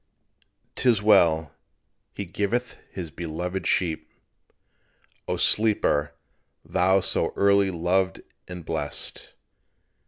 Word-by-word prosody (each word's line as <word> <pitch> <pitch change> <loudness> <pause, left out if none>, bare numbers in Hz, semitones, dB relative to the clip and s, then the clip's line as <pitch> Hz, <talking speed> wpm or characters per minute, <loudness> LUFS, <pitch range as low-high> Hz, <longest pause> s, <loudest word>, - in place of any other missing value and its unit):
'Tis 120 -4 +2
well: 85 -7 +3 0.6
"He 100 - -4
giveth 105 +7 -2 0.2
His 85 -5 -6
beloved 85 +4 -4
sleep," 80 -3 -1 1.2
O - - -1
Sleeper, 75 -9 +2 0.5
thou 95 +2 +2
so - - 0
early 100 0 +3
loved 90 +2 0 0.3
and 90 -3 -8
blest! 80 -3 -5
90 Hz, 90 wpm, -25 LUFS, 80-100 Hz, 1.2 s, well